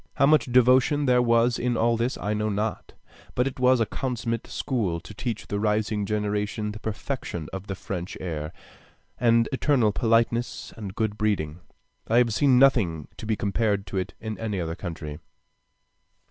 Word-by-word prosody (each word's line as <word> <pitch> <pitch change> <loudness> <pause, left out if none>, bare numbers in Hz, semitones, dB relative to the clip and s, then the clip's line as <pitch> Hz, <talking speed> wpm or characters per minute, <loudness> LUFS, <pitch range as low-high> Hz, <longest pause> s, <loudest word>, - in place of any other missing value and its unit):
How - - +4
much 150 -3 +3
devotion 130 +4 +4
there 125 -1 +4
was 115 0 +3
in 120 -1 0
all 115 +1 +3
this 120 +3 -1
I 105 - -2
know 105 0 -1
not, 105 +2 -3 0.4
but 125 - +2
it 135 -1 -4
was 125 0 +4
a 115 - +3
consummate 115 -1 -3
school 105 - -1
to 90 +5 -11
teach 110 0 -4
the 100 - -3
rising 105 -1 0
generation 105 0 -1
the 105 - -8
perfection 105 - -4
of 95 +1 -6
the 95 - -3
French 90 -1 -5
air, 80 -4 -4 0.7
and 115 -1 +4
external 130 -5 +2
politeness 115 +1 0
and 100 -4 -7
good 110 -2 -1
breeding. 90 -7 0 0.5
I 115 - +3
have 120 -2 +4
seen 135 +1 +4
nothing 105 - +3
to 110 - -7
be 110 - +1
compared 100 -1 0
to 95 0 -5
it 95 - -3
in 110 -1 -5
any 105 -4 -2
other 80 -1 -2
country.... 80 -4 -6
110 Hz, 175 wpm, -26 LUFS, 100-120 Hz, 0.7 s, How